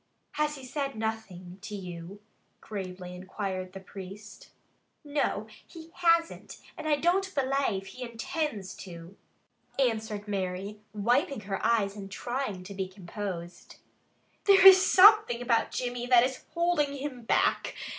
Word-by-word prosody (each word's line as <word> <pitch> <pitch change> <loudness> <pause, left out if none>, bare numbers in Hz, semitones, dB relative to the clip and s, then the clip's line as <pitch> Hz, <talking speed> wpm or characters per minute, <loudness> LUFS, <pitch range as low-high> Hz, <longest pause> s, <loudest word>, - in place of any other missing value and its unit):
"Has 300 0 0
he 270 -2 -10
said 275 0 -3
nothing 200 -5 -5
to 210 0 -6
you?" 180 +1 -8 0.4
gravely 185 -3 -7
inquired 185 0 -5
the 195 - -7
priest. 195 +2 -11 0.5
"No, 290 0 -1 0.2
he 330 -1 -12
hasn't 335 -1 +1 0.2
and - - -6
I 300 - +4
don't 370 +5 +1
belave 265 -8 0
he 255 - -11
intinds 235 - -3
to," 170 0 -10 0.6
answered 220 -5 -1
Mary, 195 +1 -3
wiping 240 +5 +1
her 195 -1 -4
eyes 215 -3 +2
and 195 -2 -8
trying 240 -3 -4
to 200 +2 -9
be 190 -1 -3
composed. 180 -2 -7 0.7
"There 390 -1 +6
is 380 0 +11
something 400 - +7
about 240 -2 +1
Jimmy 245 -1 -3
that 245 -1 +6
is 260 +1 -3
holding 340 -5 +1
him 265 -3 -5
back. 225 - +1
220 Hz, 135 wpm, -29 LUFS, 195-280 Hz, 0.7 s, is